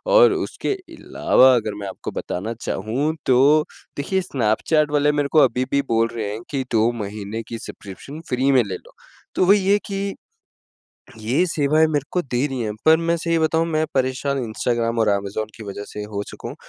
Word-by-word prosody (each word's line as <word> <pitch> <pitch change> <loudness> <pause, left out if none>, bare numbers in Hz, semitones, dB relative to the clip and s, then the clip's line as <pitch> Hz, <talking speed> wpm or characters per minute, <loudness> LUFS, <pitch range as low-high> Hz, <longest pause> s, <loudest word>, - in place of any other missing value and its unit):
और - - +8
उसके - - -2
अलावा 130 - +2
अगर 110 -3 -1
मैं 100 - -5
आपको 95 - -6
बताना 105 +6 -4
चाहूँ 125 +11 -1
तो 125 -1 +4 0.6
देखिए 190 +7 0
स्नैपचैट 145 +2 +1
वाले 145 0 +3
मेरे 145 -1 0
को 155 - +5
अभी 125 0 -1
भी 140 0 +3
बोल 115 0 +2
रहे 110 -3 -3
हैं 110 - -6
कि 135 -2 -2
2 115 0 +3
महीने 105 +2 -5
की 115 - -5
सब्सक्रिप्शन 110 - -9
फ्री 130 +2 +2
में 130 -3 +5
ले 100 -3 -5
लो। - - -14 0.4
तो - - +3
वही 195 0 +4
है 205 - +6
कि, 195 0 -3 1.0
ये 120 +11 +1
सेवाएँ 155 -1 +2
मेरे 145 -1 0
को 180 - +1
दे 125 -3 -1
रही 135 -2 -4
हैं 105 -2 -2
पर 160 0 +7
मैं 170 0 0
सही 165 0 0
बताऊँ 160 +1 +2
मैं 155 -1 +1
परेशान 135 +1 0
इंस्टाग्राम 115 +1 -1
और 110 - +3
अमेज़न 100 +1 -1
की 115 - -9
वजह 100 0 -6
से 105 - -6
हो 100 -1 -2
चुका - - -8
हूँ। - - -8
130 Hz, 195 wpm, -22 LUFS, 110-155 Hz, 1.0 s, और